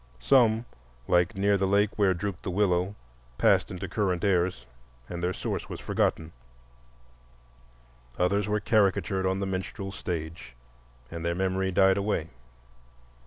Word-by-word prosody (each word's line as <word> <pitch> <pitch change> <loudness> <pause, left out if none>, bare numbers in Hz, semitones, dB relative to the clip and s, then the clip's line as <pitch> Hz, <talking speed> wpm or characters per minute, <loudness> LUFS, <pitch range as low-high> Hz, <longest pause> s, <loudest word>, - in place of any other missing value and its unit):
Some, 115 - +4 0.4
like 90 +1 +2
"Near 100 +1 +2
the 95 - +1
lake 100 +2 +3
where 100 -3 +3
drooped 95 0 -4
the - - -4
willow," 95 0 +1 0.4
passed - - +3
into 95 +1 -5
current 95 -2 -1
airs 90 -9 +1 0.4
and 85 -1 -6
their 90 +1 0
source - - -4
was - - -6
forgotten; 80 0 -1 1.9
others 100 +3 +1
were 105 0 +1
caricatured 100 -3 +1
on 95 +1 0
the - - 0
"minstrel" 95 +1 -4
stage 85 -7 -6 0.6
and 85 0 -6
their 85 0 -1
memory 95 +1 0
died 95 +1 +4
away. 100 -6 -1
95 Hz, 135 wpm, -27 LUFS, 90-100 Hz, 1.9 s, Some